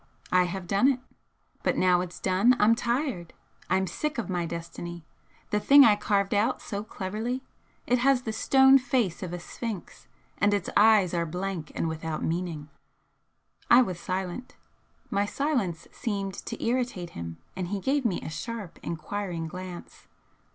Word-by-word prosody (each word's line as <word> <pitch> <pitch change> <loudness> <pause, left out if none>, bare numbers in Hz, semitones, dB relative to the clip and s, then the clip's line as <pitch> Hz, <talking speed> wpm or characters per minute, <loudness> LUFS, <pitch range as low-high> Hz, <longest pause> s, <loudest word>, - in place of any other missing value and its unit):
I 180 0 +5
have 180 +1 -4
done 200 +8 +3
it. 270 -2 +2 0.6
But - - 0
now 180 -1 +4
it's 180 -1 -6
done 195 +7 +4
I'm 215 +2 +6
tired! 235 - -2 0.4
I'm 190 0 +2
sick 300 - -3
of 210 -5 -3
my 175 -2 -1
destiny, 170 0 -7 0.5
the 210 - +2
thing 280 +6 +8
I 210 - +6
carved 200 -1 0
out 205 +2 +2
so 200 0 -5
cleverly, 220 +5 -4 0.4
it 250 0 +2
has 260 0 +3
the 220 - -3
stone 265 +4 +6
face 245 -8 0
of 180 -3 -4
a 175 - -3
Sphinx 210 +2 -7 0.3
and 205 0 +4
its 200 - -3
eyes 210 -4 +5
are 170 -1 0
blank 180 -1 -4
and - - -1
without 160 -1 -3
meaning." 165 -3 -2 1.0
I 250 +2 +8
was 185 -6 -4
silent. 185 +7 -4 0.6
My 200 +1 +1
silence 245 - -1
seemed 200 -3 -3
to - - -5
irritate 235 -8 -1
him, 85 -1 -7 0.2
and 185 -1 -3
he 200 +2 -2
gave 270 +7 +1
me 220 -7 0
a - - -5
sharp, 225 0 -6
enquiring 170 +1 -4
glance. 180 +1 -9
195 Hz, 160 wpm, -27 LUFS, 175-235 Hz, 1.0 s, thing